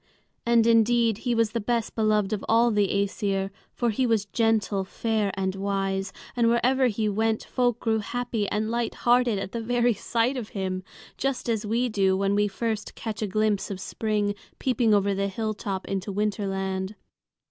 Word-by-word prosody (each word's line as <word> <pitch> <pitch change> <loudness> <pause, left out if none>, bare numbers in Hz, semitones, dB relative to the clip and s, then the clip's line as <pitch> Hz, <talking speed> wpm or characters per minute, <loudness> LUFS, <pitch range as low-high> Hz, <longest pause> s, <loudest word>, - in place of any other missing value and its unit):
And 235 -1 +5
indeed 230 -1 +4
he 240 - +2
was 225 -2 +2
the 235 - -1
best 230 +1 -1
beloved 215 -2 +1
of 205 - -3
all 230 +1 +4
the 205 -2 +2
Æsir; 200 0 -1 0.2
for 240 -2 0
he 250 +4 +1
was 220 -3 +2
gentle, 215 -2 +1
fair, 215 +1 -1
and 190 -1 -1
wise, 195 -1 -1 0.2
and 235 -1 +3
wherever 255 +3 +3
he 215 -1 0
went 220 +2 0
folk 245 -2 0
grew 220 -1 +1
happy 230 -1 -2
and 215 +1 -1
light 235 -1 -1
hearted 240 -2 +4
at 195 - -4
the 235 - -3
very 240 +1 +2
sight 230 +5 0
of 230 -4 -5
him, 185 -1 -2 0.4
just 270 -2 -2
as 220 -2 -1
we 235 +4 +1
do 195 -4 +2
when 195 +1 +1
we 205 0 +3
first 215 +1 -3
catch 220 -2 -5
a 215 - 0
glimpse 215 0 0
of 195 -2 -5
spring 210 0 -1 0.2
peeping 240 -3 +1
over 200 -1 +3
the 200 0 0
hilltop 200 -2 -3
into 195 +1 -3
Winterland. 195 -1 -2
215 Hz, 180 wpm, -26 LUFS, 200-230 Hz, 0.4 s, And